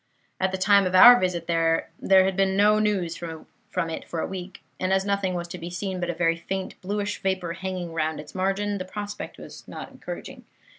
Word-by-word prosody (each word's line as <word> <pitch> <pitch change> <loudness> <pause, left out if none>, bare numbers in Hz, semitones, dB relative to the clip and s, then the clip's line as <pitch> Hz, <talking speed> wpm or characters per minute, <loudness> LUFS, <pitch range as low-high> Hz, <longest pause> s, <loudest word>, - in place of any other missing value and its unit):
"At 190 0 +1
the 190 - -2
time 200 0 +4
of 185 - -1
our 245 +6 +10
visit 180 -2 -1
there 165 -1 +1 0.2
had 190 0 +4
been 190 0 +2
no 210 +1 +5
news 195 -6 0
from 170 +2 -6
it - - -6
for 170 - -4
a - - -1
week; 185 0 -7 0.2
and 185 0 0
as 190 0 +2
nothing 200 -2 0
was 175 -1 -3
to - - -7
be 170 - -6
seen 185 +1 -4
but 175 -1 -2
a 175 - -2
very 165 -1 +1
faint 190 +3 -4
bluish 205 +2 -2
vapor 185 -3 -1
hanging 185 -2 -5
round 160 -1 -1
its 150 0 -10
margin, 195 +2 -1
the 185 - -4
prospect 205 +2 -6
was - - -11
not - - -8
encouraging. - - -8
185 Hz, 210 wpm, -25 LUFS, 175-195 Hz, 0.2 s, our